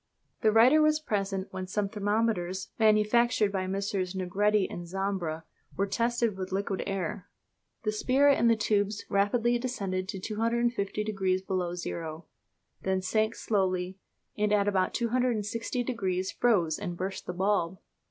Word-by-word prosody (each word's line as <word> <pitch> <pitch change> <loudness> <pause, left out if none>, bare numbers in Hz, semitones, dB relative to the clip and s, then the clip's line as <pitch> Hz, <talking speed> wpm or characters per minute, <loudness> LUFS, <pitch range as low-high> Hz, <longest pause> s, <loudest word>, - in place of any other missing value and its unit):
The 220 -3 +4
writer 245 +8 +6
was 305 0 +4
present 195 -8 -2
when 185 -1 -5
some 200 +2 -1
thermometers, 205 -3 -1
manufactured 215 0 +3
by 190 -2 -2
Messrs. 195 -1 -2
Negretti 200 +2 +2
and 175 0 -7
Zambra, 185 -4 -2 0.3
were 200 - +2
tested 230 +1 0
with 190 0 -5
liquid 195 0 -1
air. 195 -1 -3 0.6
The 215 - +1
spirit 270 +6 +3
in 235 - +4
the 230 - +5
tubes 205 -1 0
rapidly 230 +4 +2
descended 195 -7 -3
to 195 -3 -4
250 225 0 -1
degrees 190 -3 0
below 180 -2 -2
zero, 165 -2 -5 0.6
then 190 -1 0
sank 220 +4 +1
slowly, 185 -2 -1 0.4
and 210 0 0
at 205 -1 +3
about 190 -2 +1
260 235 -1 0
degrees 190 -6 -2
froze 180 -10 +2
and 175 -4 -4
burst 190 +2 -4
the 180 - -3
bulb. 190 -1 0
200 Hz, 145 wpm, -29 LUFS, 185-225 Hz, 0.6 s, writer